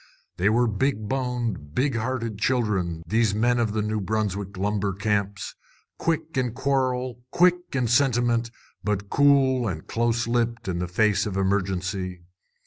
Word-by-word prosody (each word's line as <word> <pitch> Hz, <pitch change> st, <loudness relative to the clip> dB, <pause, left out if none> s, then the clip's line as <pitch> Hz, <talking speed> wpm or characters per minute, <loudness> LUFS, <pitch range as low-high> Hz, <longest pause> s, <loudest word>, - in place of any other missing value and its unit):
They 95 Hz, +4 st, +3 dB
were 120 Hz, +3 st, +3 dB
big 110 Hz, 0 st, 0 dB
boned, 120 Hz, -, -2 dB
big 135 Hz, -1 st, +1 dB
hearted 115 Hz, -2 st, -2 dB
children, 100 Hz, -9 st, 0 dB
these 110 Hz, -2 st, +2 dB
men 120 Hz, +3 st, +2 dB
of 110 Hz, -3 st, 0 dB
the 110 Hz, -1 st, 0 dB
New 105 Hz, 0 st, -1 dB
Brunswick 100 Hz, -1 st, -2 dB
lumber 100 Hz, 0 st, 0 dB
camps, 100 Hz, -1 st, -1 dB, 0.5 s
quick 160 Hz, -1 st, -1 dB
in 125 Hz, -3 st, 0 dB
quarrel, 130 Hz, -2 st, -1 dB
quick 180 Hz, +4 st, +4 dB, 0.2 s
in 125 Hz, -3 st, +1 dB
sentiment, 120 Hz, -2 st, +2 dB, 0.3 s
but 105 Hz, -1 st, -2 dB
cool 135 Hz, -3 st, +4 dB
and 80 Hz, -6 st, -4 dB
close 115 Hz, +1 st, 0 dB
lipped 115 Hz, -2 st, 0 dB
in 90 Hz, -2 st, -1 dB
the 90 Hz, -, -2 dB
face 105 Hz, +3 st, +2 dB
of 95 Hz, -2 st, -3 dB
emergency. 95 Hz, -2 st, -1 dB
110 Hz, 145 wpm, -25 LUFS, 100-125 Hz, 0.5 s, quick